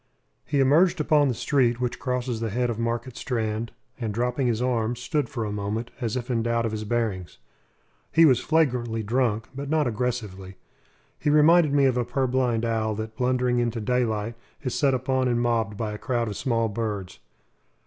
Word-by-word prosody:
He 140 Hz, -1 st, 0 dB
emerged 165 Hz, +7 st, +4 dB
upon 150 Hz, -1 st, +3 dB
the 125 Hz, -, 0 dB
street 120 Hz, -2 st, +1 dB
which 125 Hz, -1 st, -2 dB
crosses 125 Hz, -2 st, -2 dB
the 115 Hz, 0 st, -2 dB
head 120 Hz, +3 st, 0 dB
of 115 Hz, -, -5 dB
Market 115 Hz, +1 st, -2 dB
Strand, 115 Hz, -2 st, -2 dB, 0.3 s
and, 115 Hz, -3 st, -2 dB
dropping 125 Hz, +4 st, 0 dB
his 115 Hz, -2 st, 0 dB
arms, 120 Hz, -1 st, 0 dB
stood 145 Hz, 0 st, -1 dB
for 115 Hz, -4 st, -3 dB
a 105 Hz, -, -3 dB
moment 105 Hz, +3 st, -3 dB
us 115 Hz, -1 st, -1 dB
if 125 Hz, 0 st, -3 dB
in 115 Hz, -2 st, +1 dB
doubt 115 Hz, 0 st, 0 dB
of 115 Hz, -, -1 dB
his 110 Hz, 0 st, -4 dB
bearings. 105 Hz, -6 st, -2 dB, 0.7 s
He 165 Hz, 0 st, +6 dB
was 130 Hz, -5 st, +5 dB
flagrantly 125 Hz, -8 st, +1 dB
drunk, 115 Hz, -1 st, 0 dB
but 140 Hz, +1 st, -6 dB
not 155 Hz, -1 st, +2 dB
aggressively. 110 Hz, -6 st, -3 dB, 0.6 s
He -, -, 0 dB
reminded 155 Hz, +1 st, +5 dB
me 140 Hz, -1 st, +4 dB
of 130 Hz, -2 st, +2 dB
a 125 Hz, -, +2 dB
purblind 125 Hz, -3 st, 0 dB
owl 110 Hz, -1 st, 0 dB
that, 110 Hz, +1 st, -6 dB
blundering 125 Hz, 0 st, +1 dB
Into 120 Hz, -1 st, -1 dB
daylight, 115 Hz, -1 st, 0 dB, 0.3 s
is 125 Hz, -3 st, -2 dB
set 140 Hz, -3 st, +2 dB
upon 130 Hz, 0 st, 0 dB
and 120 Hz, -1 st, +1 dB
mobbed 115 Hz, -4 st, 0 dB
by 110 Hz, -1 st, -3 dB
a 105 Hz, -, -7 dB
crowd 120 Hz, -3 st, -1 dB
of 105 Hz, -, -4 dB
small 115 Hz, -1 st, 0 dB
birds. 105 Hz, -3 st, -4 dB
120 Hz, 190 wpm, -25 LUFS, 110-130 Hz, 0.7 s, He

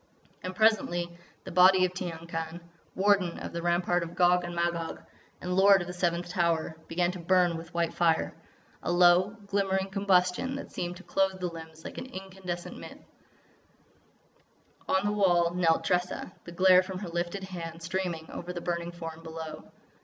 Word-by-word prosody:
And 185 Hz, 0 st, -5 dB
presently 175 Hz, -6 st, +2 dB, 0.3 s
the -, -, -8 dB
body 185 Hz, +1 st, +6 dB
of 180 Hz, -, -3 dB
Tiyang 170 Hz, -3 st, -6 dB
Khan, 165 Hz, 0 st, -4 dB, 0.4 s
Warden 195 Hz, -3 st, +2 dB
of -, -, -7 dB
the 170 Hz, -, -3 dB
Rampart 175 Hz, +1 st, +1 dB
of 170 Hz, 0 st, -6 dB
Gog 180 Hz, 0 st, +4 dB
and 175 Hz, 0 st, -5 dB
Magog, 170 Hz, -1 st, -1 dB, 0.4 s
and 180 Hz, 0 st, -3 dB
Lord 195 Hz, +1 st, +7 dB
of -, -, -4 dB
the 180 Hz, -, -6 dB
Seventh 175 Hz, -1 st, -1 dB
Tower, 170 Hz, -3 st, 0 dB
began 175 Hz, +1 st, +1 dB
to 180 Hz, -, -8 dB
burn 175 Hz, 0 st, +3 dB
with 165 Hz, +1 st, -8 dB
white 170 Hz, -1 st, 0 dB
fire—a 170 Hz, 0 st, -2 dB
low, 180 Hz, +3 st, +5 dB
glimmering 195 Hz, -1 st, 0 dB
combustion 195 Hz, +5 st, +2 dB
that 280 Hz, -, -7 dB
seemed 175 Hz, 0 st, -4 dB
to 190 Hz, -, -13 dB
clothe 190 Hz, -1 st, 0 dB
the 180 Hz, -1 st, -2 dB
limbs 160 Hz, -1 st, -10 dB
like -, -, -6 dB
an -, -, -7 dB
incandescent 190 Hz, -5 st, -7 dB
mist. -, -, -10 dB, 1.9 s
On 190 Hz, +1 st, +2 dB
the 205 Hz, -, +2 dB
wall 175 Hz, -4 st, +3 dB
knelt 170 Hz, -2 st, +2 dB
Tressa, 180 Hz, +1 st, -1 dB
the 170 Hz, -, -8 dB
glare 185 Hz, +1 st, +6 dB
from 185 Hz, 0 st, -6 dB
her 185 Hz, -2 st, -6 dB
lifted 175 Hz, +3 st, -3 dB
hand 165 Hz, -3 st, -7 dB
streaming 170 Hz, -2 st, -3 dB
over 180 Hz, +1 st, -6 dB
the 175 Hz, -, -4 dB
burning 170 Hz, 0 st, -3 dB
form 165 Hz, -2 st, -8 dB
below. 160 Hz, -1 st, -7 dB
175 Hz, 170 wpm, -29 LUFS, 170-190 Hz, 1.9 s, Lord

